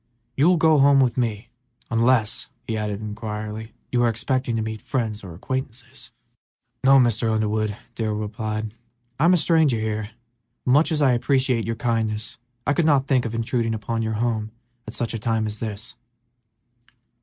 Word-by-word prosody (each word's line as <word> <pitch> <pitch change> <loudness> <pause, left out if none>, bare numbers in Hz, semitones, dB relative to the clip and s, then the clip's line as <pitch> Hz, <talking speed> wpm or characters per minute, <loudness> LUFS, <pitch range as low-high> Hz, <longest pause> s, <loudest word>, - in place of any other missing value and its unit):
You 145 +6 +4
will 180 - +4
go 155 -2 +4
home 140 0 +6
with 130 -3 +3
me, 115 -3 -2 0.4
unless," 115 -1 +2 0.2
he 110 - -2
added, 105 -1 -3
inquiringly, 110 0 -6 0.2
"you 120 - +2
are 120 - +4
expecting 125 +1 -1
to 110 - 0
meet 110 0 -5
friends 110 -6 -2
or 90 -4 -9
acquaintances?" 125 +3 -6 0.7
"No, 135 +1 +7
Mr. 120 -3 +2
Underwood," 110 -1 0 0.2
Darrell 110 -2 -2
replied, 110 0 -4 0.5
"I 155 - +4
am 175 - +6
a - - +3
stranger 160 -7 +3
here, 110 -1 -2 0.6
but, 125 - +2
much 150 +6 +4
as 150 -2 +1
I 130 -3 +5
appreciate 130 -2 +1
your 115 - -1
kindness, 110 -2 -2 0.3
I 140 - +2
could 165 +1 +2
not 140 -3 +4
think 130 -3 +2
of 115 0 -3
intruding 115 0 0
upon 115 +2 -3
your 110 0 -1
home 110 -1 -1 0.4
at - - -7
such 120 -1 -2
a 115 - -3
time 110 -1 0
as 105 0 -5
this." 110 0 -6
115 Hz, 175 wpm, -23 LUFS, 110-130 Hz, 0.7 s, No